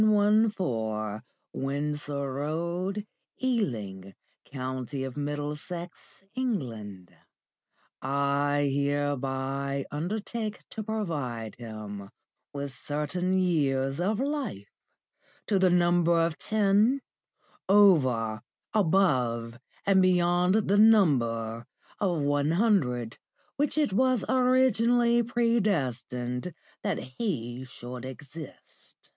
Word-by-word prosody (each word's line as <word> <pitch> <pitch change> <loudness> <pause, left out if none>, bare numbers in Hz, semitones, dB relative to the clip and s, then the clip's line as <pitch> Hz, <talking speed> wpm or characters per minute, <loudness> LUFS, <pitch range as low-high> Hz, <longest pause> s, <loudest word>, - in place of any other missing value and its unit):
114, 185 - +2 0.3
Windsor 140 0 -2
Road, 170 +8 -2 0.3
Ealing, 110 - -2 0.3
County 130 0 -4
of 130 -2 -5
Middlesex, 150 +6 -5
England, 115 - -4 0.9
I 140 +1 +1
hereby 140 -1 -1
undertake 210 +7 -4
to 220 - -4
provide 150 - -3
him 105 -4 -7 0.4
with 140 -1 -4
certain 165 +7 -1
years 140 -6 +1
of 205 +5 0
life, 275 - -3 0.7
to 200 -3 +2
the 185 -1 +5
number 175 -1 +3
of 165 -1 +1
ten, 215 +5 +3 0.7
over, 130 - +4 0.3
above, 130 - +2 0.3
and 195 -1 +5
beyond 180 0 +3
the 200 +1 +4
number 115 - +3 0.3
(of 180 -6 +1
one 145 +1 +1
hundred) 130 - +1 0.4
which 290 +2 0
it 295 -10 +2
was 255 0 +2
originally 245 -2 +3
predestined 175 - -1 0.3
that - - -1
he 130 - -4
should 125 0 -8
exist. 140 +4 -11
150 Hz, 85 wpm, -28 LUFS, 130-205 Hz, 0.9 s, the